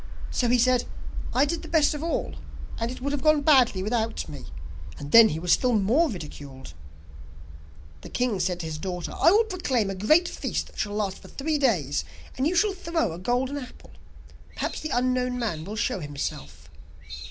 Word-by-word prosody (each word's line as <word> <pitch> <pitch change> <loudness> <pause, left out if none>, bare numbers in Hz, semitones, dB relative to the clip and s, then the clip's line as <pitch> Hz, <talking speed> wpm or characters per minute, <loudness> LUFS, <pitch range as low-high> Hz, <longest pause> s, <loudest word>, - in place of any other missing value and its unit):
So 245 - +1
he 245 - +4
said: 250 0 +3 0.5
"I 265 +3 +3
did 335 +3 -2
the - - -9
best 315 -2 +3
of 295 - -5
all, 335 - -2 0.5
and 230 0 -1
it 255 - -7
would 280 +2 -1
have 285 -2 -2
gone 305 0 +4
badly 255 -10 +4
without 225 +1 -1
me." 145 -3 -9 0.5
And 145 0 -8
then 230 -1 +9
he 155 - -3
was 175 +1 -1
still 250 +8 +3
more 235 +11 +3
ridiculed.' 145 - -9 1.3
The - - -10
king 245 -6 0
said 180 0 -1
to - - -6
his 155 -1 -5
daughter: 180 -1 -4
'I - - +5
will 420 +5 +5
proclaim 275 - -1
a - - -3
great 305 - +3
feast - - -3
that - - -14
shall 205 - -2
last 200 -3 -2
for - - -14
three 300 +2 -2
days, 160 - +1 0.3
and 265 +3 +1
you 355 - 0
shall 410 +3 +3
throw 335 - -1
a 165 - -7
golden 250 +8 -1
apple. 250 - -12 0.6
Perhaps - - -3
the 310 - -4
unknown 250 0 0
man 170 -10 -3
will 205 +3 -6
show 205 - -1
himself. 85 - -6
240 Hz, 195 wpm, -26 LUFS, 180-285 Hz, 1.3 s, then